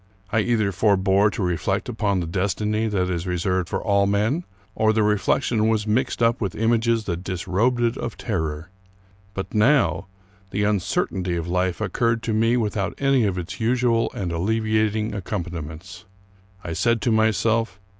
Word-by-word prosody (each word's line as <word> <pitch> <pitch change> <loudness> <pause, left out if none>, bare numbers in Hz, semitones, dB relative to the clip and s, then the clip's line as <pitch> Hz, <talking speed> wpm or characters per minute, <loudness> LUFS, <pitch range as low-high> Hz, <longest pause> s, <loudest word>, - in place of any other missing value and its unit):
I 110 - +2
either 110 -2 +1
forbore 100 +1 +3
to 105 0 -4
reflect 90 +3 -1
upon 105 -5 0
the - - -3
destiny 105 +5 -1
that 95 -4 0
is 90 0 -3
reserved 90 0 -1
for - - -2
all 100 -2 +2
men, 110 - 0 0.3
or 110 0 +2
the 110 0 +2
reflection 105 +2 +1
was 110 -2 +1
mixed 120 +2 0
up 115 +1 +2
with 100 -4 -2
images 115 0 +1
that 90 -3 -4
disrobed 95 +7 0
it 115 +1 +1
of - - -5
terror; 80 -4 -3 0.6
but 95 - -5
now 110 -3 +3 0.4
the 105 +2 -1
uncertainty 95 -3 0
of 85 0 -3
life 90 0 0
occurred 115 +3 0
to 115 - -1
me 115 +3 +2
without 105 -4 -1
any 135 -4 +3
of 95 -3 -1
its 90 +6 -6
usual 120 0 +1
and 90 -3 -3
alleviating 110 +3 0
accompaniments. 90 -2 -6 0.6
I 85 - -4
said 115 +6 +1
to 120 - +2
myself. 110 -1 +1
105 Hz, 160 wpm, -23 LUFS, 95-115 Hz, 0.6 s, forbore